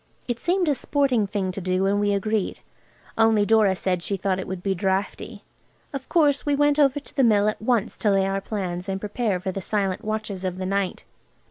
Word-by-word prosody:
It 240 -2 -2
seemed 355 +5 +1
a 295 - +4
sporting 265 -5 +1
thing 195 -2 -2
to 195 - -6
do, 185 +1 0
and 200 +1 +2
we 205 0 +1
agreed. 205 +1 -1 0.6
Only 225 -2 +4
Dora 215 -3 +4
said 180 -1 -1
she 195 +3 -2
thought 190 0 -1
it 190 - -5
would 185 -1 -5
be 195 - +1
draughty. 190 +2 -2 0.5
Of 270 -2 -6
course 290 -4 +3
we 290 -1 +1
went 290 +1 +3
over 280 -1 +4
to 285 - -15
the 270 - +3
Mill 210 -3 +4
at 215 - -2
once 230 -1 0
to 210 - +1
lay 195 -1 +3
our 195 0 -1
plans 185 -3 -4
and 190 0 -2
prepare 210 -1 -1
for 190 +1 -3
the 195 - -5
silent 195 -1 -1
watches 215 -3 -4
of 185 -1 -2
the 185 - -4
night. 195 -1 -1
205 Hz, 220 wpm, -24 LUFS, 190-230 Hz, 0.6 s, a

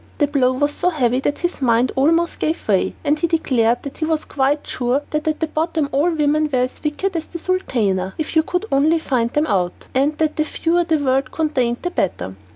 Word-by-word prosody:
The 295 - +3
blow 270 -3 +2
was 290 +3 +1
so 355 - +1
heavy 255 -7 +1
that 290 +2 -1
his 350 -4 -3
mind 240 0 +3
almost 330 +5 +2
gave 320 +2 -2
way, 195 -3 +1
and 300 0 +1
he 340 - +1
declared 245 -8 +1
that 280 - -8
he 315 - 0
was 315 -1 -1
quite 280 +2 0
sure 255 +3 -1
that 305 +1 -2
at 310 0 -1
bottom 315 -2 0
all 295 +6 +2
women 305 -1 +1
were 260 - +1
as 250 +1 -1
wicked 345 +5 -2
as 320 -1 -3
the 340 - -7
sultana, 220 - -1
if 315 +1 -4
you 320 - +6
could 360 +5 -2
only 305 +4 +3
find 250 -7 0
them 295 +1 +2
out, 180 - -1
and 285 +3 +1
that 310 -1 0
the 310 - +3
fewer 340 +3 0
the 325 -2 +2
world 265 -2 +1
contained 255 -7 -1
the 355 - -2
better. 135 - -2
295 Hz, 220 wpm, -20 LUFS, 255-320 Hz, -, you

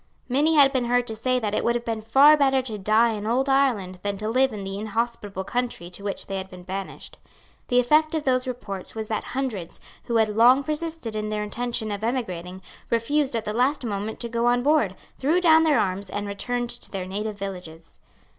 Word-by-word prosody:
Many 295 +5 +2
had 280 -2 +6
been 255 -2 +1
heard 245 0 +2
to 220 - -4
say 255 +3 0
that 215 -4 -2
it - - 0
would 235 - +2
have 240 0 -3
been 225 -1 -2
far 275 +7 +6
better 270 -3 +2
to 220 -5 -5
die 220 +4 +3
in 210 -1 -4
old 255 +4 +1
Ireland 240 -10 +1
than 200 -1 -2
to 215 +2 -3
live 260 +3 +3
in 210 -2 -6
the 195 +1 -5
inhospitable 215 -2 -3
country 200 -4 -3
to 200 - -7
which 200 -1 -4
they 195 - -4
had 190 0 -6
been 180 -1 -11
banished. 190 +1 -7 0.5
The 245 - +3
effect 305 +6 +3
of 310 - -1
those 255 -1 +1
reports 200 -7 -5
was 220 -1 -4
that 215 - -1
hundreds, 225 -11 -3 0.3
who 235 - -2
had 220 -1 +3
long 250 +5 +6
persisted 310 -6 -4
in 215 0 -2
their 210 0 -2
intention 235 +1 -3
of 205 +1 -4
emigrating, 185 -7 -3 0.3
refused 265 +4 +1
at 225 -1 -2
the 210 - -2
last 255 +3 +1
moment 210 0 -4
to 235 - -2
go 235 +1 0
on 245 0 +2
board, 285 -10 +2 0.2
threw 310 +7 +2
down 320 -3 +6
their 305 -3 +4
arms, 190 0 -1
and 205 +1 -3
returned 240 +4 -3
to 240 - -9
their 190 -2 -4
native 205 +2 -4
villages. 180 -5 -8
230 Hz, 220 wpm, -24 LUFS, 200-255 Hz, 0.5 s, had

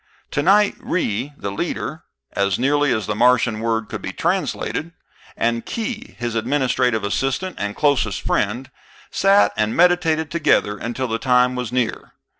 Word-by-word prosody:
Tonight 200 +7 +3
Ry, 140 - -2
the 100 - -4
leader 100 - -4 0.3
(as 100 -2 0
nearly 145 +3 +2
as 110 -3 0
the 105 - -1
Martian 120 0 +3
word 115 -1 -1
can - - -6
be - - -4
translated), 165 +3 -2 0.4
and 115 0 0
Khee, 230 +2 -5
his 120 -1 -3
administrative 125 -2 +1
assistant 135 - -1
and 100 0 -3
closest 130 -9 +1
friend, 120 +6 -1 0.4
sat 195 +1 +4
and 105 +1 0
meditated 165 -3 +3
together 150 -10 +2
until 120 +5 -3
the 115 -1 -2
time 125 0 +3
was 125 -2 -4
near. 125 -2 -2
125 Hz, 145 wpm, -21 LUFS, 110-150 Hz, 0.4 s, sat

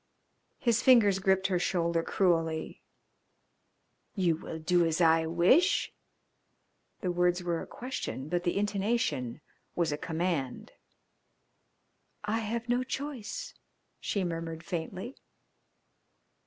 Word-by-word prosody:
His 235 -2 +2
fingers 225 -7 +5
gripped 190 0 +2
her 185 -2 +2
shoulder 170 -2 +1
cruelly. 165 -3 0 1.3
"You 180 -5 +2
will 160 - -7
do 175 +2 +2
as 165 0 0
I 165 -1 +4
wish?" 180 - +3 1.1
The 180 - 0
words 175 0 +1
were 170 -1 -1
a - - -8
question, 240 - -5
but 175 +2 0
the 175 +2 0
intonation 200 - -1 0.3
was 170 -3 +1
a 145 - -3
command. 160 -6 -2 1.5
"I 215 +2 0
have 230 +2 -3
no 245 +1 +1
choice," 260 -4 -5 0.5
she 200 - -1
murmured 165 -1 -4
faintly. 185 +9 -5
180 Hz, 110 wpm, -30 LUFS, 165-210 Hz, 1.5 s, fingers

